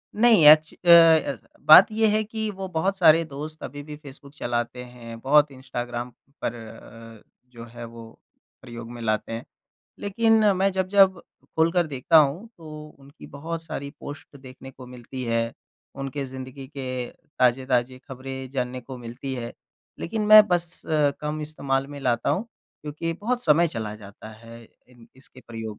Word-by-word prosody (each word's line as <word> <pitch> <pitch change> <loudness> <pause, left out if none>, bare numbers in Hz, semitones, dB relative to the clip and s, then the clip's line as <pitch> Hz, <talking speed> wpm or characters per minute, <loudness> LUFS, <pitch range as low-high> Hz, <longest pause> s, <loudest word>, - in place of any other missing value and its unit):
नहीं, 220 -8 +5
एक्च 155 +1 +7
अ, 175 - -4
ऐसा 165 -2 +5 0.2
बात - - +10
ये 220 0 +2
है 215 +1 +1
कि 220 0 -4
वो 190 0 -6
बहुत 185 +3 -1
सारे 165 -2 +5
दोस्त 155 +1 -9
अभी 145 0 -7
भी 150 0 -9
फेसबुक 140 -1 -14
चलाते 120 -1 -3
हैं, 120 -2 -11
बहुत 145 +1 +4
इंस्टाग्राम 120 -2 -6 0.3
पर - - -1
अ, 115 0 -13 0.3
जो 115 -1 -11
है 120 0 -10
वो 115 -1 -11 0.5
प्रयोग 115 -2 -10
में 120 -1 -9
लाते 110 0 -2
हैं। 115 - -6 0.6
लेकिन 225 +2 +2
मैं 195 +1 +2
जब-जब 190 0 +3 0.4
खोल 160 +1 +3
कर 175 -2 +1
देखता 145 +3 +1
हूँ 155 +10 +1
तो 155 -2 -10
उनकी 140 +1 -15
बहुत 160 +3 -6
सारी 140 -3 -6
पोस्ट 145 0 -10
देखने 130 0 -12
को 130 -1 -13
मिलती 125 +1 -9
है, 115 0 -1 0.4
उनके 135 +1 -5
ज़िंदगी 130 +1 -9
के 130 -2 -4 0.3
ताज़े-ताज़े 130 0 +1
खबरें 130 0 -7
जानने 125 -1 -3
को 130 +1 -10
मिलती 120 +3 -7
है। 120 -1 -6 0.5
लेकिन 215 +5 -3
मैं 215 0 +9
बस 175 -1 -2
अ, 150 -2 +2
कम 150 +1 -4
इस्तेमाल 135 -3 -2
में 145 0 -9
लाता 120 -3 0
हूँ 215 +5 -1 0.4
क्योंकि 155 +3 -4
बहुत 245 +3 -2
समय 165 +2 +4
चला 110 -5 -5
जाता 105 +1 -13
है 115 +1 -13 0.3
इन 120 -2 -19
इसके 130 0 -15
प्रयोग 110 -2 -7
135 Hz, 165 wpm, -24 LUFS, 120-165 Hz, 0.6 s, बात